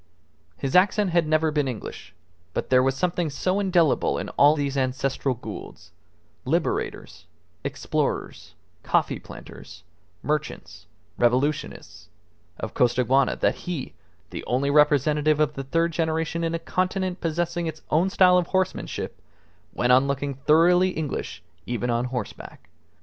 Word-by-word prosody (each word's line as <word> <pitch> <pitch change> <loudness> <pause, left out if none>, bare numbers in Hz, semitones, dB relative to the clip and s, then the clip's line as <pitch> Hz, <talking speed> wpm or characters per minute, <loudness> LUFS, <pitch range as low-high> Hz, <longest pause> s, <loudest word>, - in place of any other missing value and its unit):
His 135 +3 -3
accent 195 +1 +4
had 170 -2 +2
never 155 0 +2
been 150 -2 0
English; 120 -5 -7 0.4
but - - -3
there 130 0 +6
was 135 0 +1
something 175 +1 -1
so 185 +7 -1
indelible 175 -7 +2
in - - -4
all 145 +2 +5
these 140 -2 -2
ancestral 135 0 -1
Goulds 85 -6 -9 0.5
liberators, 140 - -2 0.4
explorers, - - -3 0.3
coffee - - 0
planters, 80 - -12 0.4
merchants, 150 0 -4 0.3
revolutionists 120 - -1 0.5
of 110 - -5
Costaguana, 125 +2 +2
that - - +1 0.2
he, 160 -7 -4 0.4
the - - -6
only 135 +3 0
representative 150 +1 +3
of 150 -1 +2
the 135 - -5
third 165 +4 +1
generation 165 0 -1
in 165 0 -1
a - - 0
continent 185 +2 -2
possessing 170 +1 -1
its 160 -1 -7
own 170 +5 +3
style 180 -2 +5
of 175 - -2
horsemanship, 190 -1 -2 0.5
went 120 +1 +1
on 130 +2 +5
looking 140 0 -2
thoroughly 170 +7 +4
English 150 - -4 0.2
even 120 0 -1
on 120 +1 0
horseback. 125 -7 -7
150 Hz, 135 wpm, -24 LUFS, 130-170 Hz, 0.5 s, there